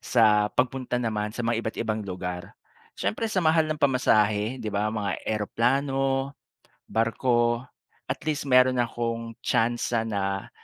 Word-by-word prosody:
sa 105 -3 +4
pagpunta 125 -1 -1
naman 110 -3 -1
sa 120 - -3
mga 115 0 +1
iba't 110 -1 -5
ibang 110 0 -1
lugar. 90 -2 -6 0.4
Siyempre, 225 - -2
sa 185 -4 0
mahal 160 0 +4
ng 155 - -1
pamasahe, 110 -4 +2
'di 110 -5 -5
ba? 105 +1 0
Mga 105 -2 -2
eroplano, 135 +5 0 0.6
barko, 120 +1 +1 0.5
at - - -2
least 145 -2 -2
mayroon 130 0 +5
na'kong 115 -1 -3
tsansa 120 0 +1
na 100 -3 -2
115 Hz, 135 wpm, -26 LUFS, 105-130 Hz, 0.6 s, mayroon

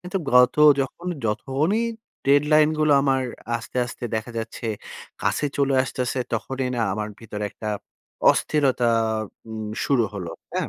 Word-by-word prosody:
কিন্তু 180 +2 -5 0.2
গত 125 +2 +6 0.2
যখন 155 +6 -4 0.2
যখনই 140 - 0 0.4
ডেডলাইন 150 +2 +5
গুলো 155 -1 +4
আমার 135 -1 +2 0.3
আস্তে, 120 +2 -9
আস্তে 120 - -8
দেখা 110 +2 -4
যাচ্ছে 115 +1 -5 0.6
কাছে 145 - +1
চলে 140 -1 +2
আসতেছে, 130 0 -2
তখনই 130 +3 -2
না 120 - 0
আমার 105 0 -3
ভিতরে 105 -2 -5
একটা 110 - -6 0.6
অস্থিরতা 135 -5 +1 0.6
উম 110 -1 -5 0.2
শুরু 130 -5 +3
হলো, 90 -4 -5 0.2
হ্যাঁ? - - -1
130 Hz, 135 wpm, -24 LUFS, 115-145 Hz, 0.6 s, গত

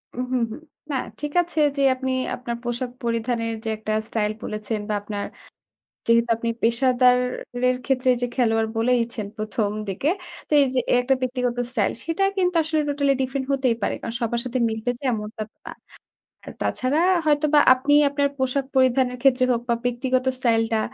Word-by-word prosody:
উ - - -14
হুম, 250 -2 +1
হুম। 300 - -8 0.3
না, - - -1 0.3
ঠিক 295 0 -4
আছে। 345 -2 -3 0.2
যে - - +1
আপনি 260 0 -3 0.2
আপনার 240 -1 -5
পোশাক 240 +1 -2
পরিধানের 230 0 -1
যে 225 - -2
একটা 215 0 -5 0.2
স্টাইল 210 -2 -1
বলেছেন 215 0 -3
বা, - - 0
আপনার 205 -1 -4 0.8
যেহেতু 230 0 +3
আপনি 230 0 -2
পেশাদারের 250 +1 +2
ক্ষেত্রে 255 -1 +1
যে - - +2
খেলোয়াড় 225 -3 +2
বলেইছেন 235 -2 0
১ম 215 0 -1 0.2
দিকে। 195 +10 -1 0.4
তো - - -34
এইযে 260 -2 +2
এই - - +5
একটা 265 +1 +2
ব্যক্তিগত 250 -1 -1
স্টাইল, 215 -6 +1
সেটা 330 +4 -1
কিন্তু 360 -2 +1
আসলে 315 -1 0
টোটালি 280 -1 +2
ডিফারেন্ট 265 +1 -2
হতেই 265 -4 +2
পারে। - - 0
কারণ 230 - -5
সবার 235 +1 0
সাথে 250 +1 -2
মিলবে 220 +2 -3
যে - - -17
এমনটা 215 0 -4
তো - - -52
না। - - -5 0.7
আর - - -7
তাছাড়া 265 +5 0 0.3
হয়তোবা 300 0 +4
আপনি 270 +3 0 0.2
আপনার 280 0 +1
পোশাক 260 +1 0
পরিধানের 255 -1 +3
ক্ষেত্রে 255 -1 +4
হোক 235 - 0
বা, 235 - +3
ব্যক্তিগত 255 +1 0
স্টাইলটা 225 -2 +1
250 Hz, 170 wpm, -23 LUFS, 230-265 Hz, 0.8 s, এই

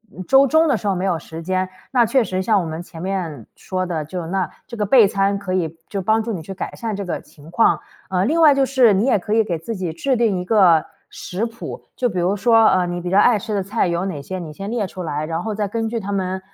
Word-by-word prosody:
嗯 185 - -6
周 270 +1 +6
中 315 +4 +3
的 275 -6 +2
时 210 - -5
候 195 - +2
没 180 - -2
有 180 -3 +1
时 160 +1 -9
间。 185 +2 -1 0.2
那 245 -3 +4
确 255 +2 +2
实 185 -3 -2
像 210 -2 +3
我 - - -4
们 160 +1 -5
前 165 -2 -11
面 175 - -4
说 185 -1 -3
的， 160 -4 -3
就 170 +1 -5
那 185 -1 -1 0.2
这 235 - -8
个 210 - 0
配 225 0 +6
餐 195 0 0
可 185 -2 -4
以 165 -3 -1
就 200 - -3
帮 220 +4 +2
助 230 - -4
你 175 - -4
去 195 - -7
改 190 - -6
善 225 -4 -4
这 200 - -4
个 180 - -3
情 150 +2 -17
况。 175 +6 +3 0.3
呃 185 0 +1
另 315 +8 +1
外 305 -3 +8
就 275 -1 +2
是 255 -5 +4
你 195 +4 +2
也 265 - +3
可 210 +3 -3
以 225 - +4
给 180 -6 -2
自 220 +8 -5
己 180 -4 -3
制 260 +11 0
定 225 -5 +1
一 180 - -5
个 180 -7 +4 0.2
食 195 +6 -4
谱。 230 0 -8
就 250 - +1
比 185 - -3
如 180 +4 +1
说 225 +1 +5
呃 185 -1 +3
你 175 0 -4
比 175 - -4
较 190 - +2
爱 215 +1 +5
吃 215 +2 -5
的 195 - 0
菜 200 0 0
有 170 +2 -1
哪 155 -7 -4
些， 185 +6 -6
你 160 -3 -7
先 195 +6 -6
列 225 -3 -1
出 185 - -8
来， 155 -2 -3
然 165 +1 -3
后 220 -1 -3
再 205 -1 -1
根 225 +2 -2
据 230 0 -2
它 200 0 -5
们 190 -1 -2
195 Hz, 305 characters per minute, -20 LUFS, 175-225 Hz, 0.3 s, 外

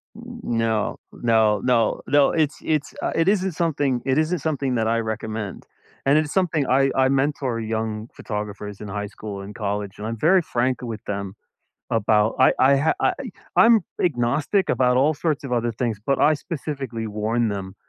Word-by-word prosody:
N 230 - -11 0.2
n 120 - -1
no, 110 -2 0
no, 110 -3 +2
no, 120 -3 +2
no, 145 0 +4
it's 155 -3 0
it's, 155 -2 -1
uh, - - -1
it 165 +1 +2
isn't 190 -2 +2
something 145 -7 0
it 135 0 +1
isn't 160 +3 +1
something 140 -5 -1
that 110 -1 +1
I 115 0 +2
recommend. 110 -2 -4 0.4
And 140 +2 +5
it 155 - +2
is 145 - -7
something 165 -7 +1
I 135 +1 +3
I 130 0 +3
mentor 135 -3 0
young 110 0 -3
photographers 105 -1 -6
in 105 - -6
high 105 +1 -3
school 100 -1 -7
and 100 +2 -9
college, 100 -2 -3
and 105 - -6
I'm 115 0 -4
very 180 - +4
frank 125 -1 -1
with 115 -3 -6
them 100 -1 -4 0.6
about 110 0 +2
I 130 - +6
I 135 +2 +5
ha 145 +4 +2
I - - +3
eh - - -6 0.3
I'm 230 -1 +7 0.2
agnostic 150 - +1
about 125 -1 +2
all 150 +4 +3
sorts 150 -1 -2
of 130 - -5
other 120 -1 0
things, 115 -1 -2
but 140 -1 +1
I 155 - +5
specifically 140 -7 -5
warn 110 +2 0
them 95 -2 -5
120 Hz, 190 wpm, -23 LUFS, 110-145 Hz, 0.6 s, I'm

